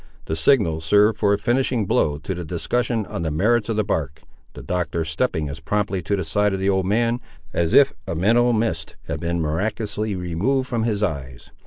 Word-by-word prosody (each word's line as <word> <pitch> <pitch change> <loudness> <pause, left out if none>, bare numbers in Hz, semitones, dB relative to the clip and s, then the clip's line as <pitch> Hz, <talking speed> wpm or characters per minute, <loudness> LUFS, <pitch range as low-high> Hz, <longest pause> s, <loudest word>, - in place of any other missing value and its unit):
The 80 - -2
signal 80 - +3
served 105 +6 +3
for 100 -2 +3
a 100 - +3
finishing 120 +1 +1
blow 75 -5 +1
to 80 +6 -4
the 90 -1 -5
discussion 110 +7 -1
on 85 - -5
the 80 - -1
merits 105 +9 +1
of 115 - 0
the 110 - +1
bark, 75 -6 -3 0.3
the - - -9
Doctor 85 -2 -2
stepping 80 -1 -1
as 70 +2 -6
promptly 100 +3 -1
to 100 - -1
the 95 -4 -3
side 105 +5 +1
of - - -4
the 95 +1 +2
old 95 -1 0
man, 115 +4 +1 0.3
as 85 -1 +1
if 140 -1 +6
a 85 - -2
mental 115 +8 +3
mist 100 -9 -1
had - - -4
been 85 +1 -2
miraculously 105 +6 -2
removed 95 +10 -1
from 115 -2 -1
his 105 -3 0
eyes. 65 -9 -4
100 Hz, 205 wpm, -22 LUFS, 80-110 Hz, 0.3 s, if